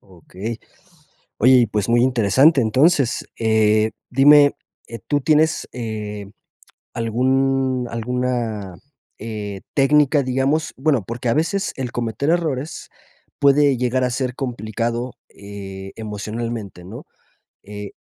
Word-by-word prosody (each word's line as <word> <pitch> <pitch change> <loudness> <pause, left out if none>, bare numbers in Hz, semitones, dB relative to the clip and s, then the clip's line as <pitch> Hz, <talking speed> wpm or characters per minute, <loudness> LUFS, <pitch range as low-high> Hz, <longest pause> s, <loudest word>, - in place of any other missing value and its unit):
Okey, 95 +5 -8 0.8
oye, 130 +4 +5
y, 120 - +4
pues, 105 -1 -2
muy 120 +1 +3
interesante 130 - +4
entonces, 135 +4 +2
eh, 110 -1 +2 0.2
dime, 145 +2 +6 0.3
eh, 115 - -7
¿tú 145 0 +1
tienes, 155 +1 +2
eh, 105 -4 -6 0.6
algún 130 +2 0
alguna, 115 -5 -3 0.4
eh, 105 -3 -6
técnica, 145 +1 +3
digamos? 135 +5 0
Bueno, 135 -7 +1
porque 120 +1 -4
a - - +2
veces 175 +6 -1
el 130 -3 -4
cometer 120 +5 -2
errores 155 -4 -2 0.5
puede 140 -1 +4
llegar 125 +1 0
a 125 - 0
ser 125 0 -2
complicado, 120 0 -3 0.2
eh, 95 -1 -9
emocionalmente, 110 -2 -6
¿no? 90 - -10 0.6
Eh, 105 0 -8
120 Hz, 115 wpm, -20 LUFS, 110-135 Hz, 0.8 s, dime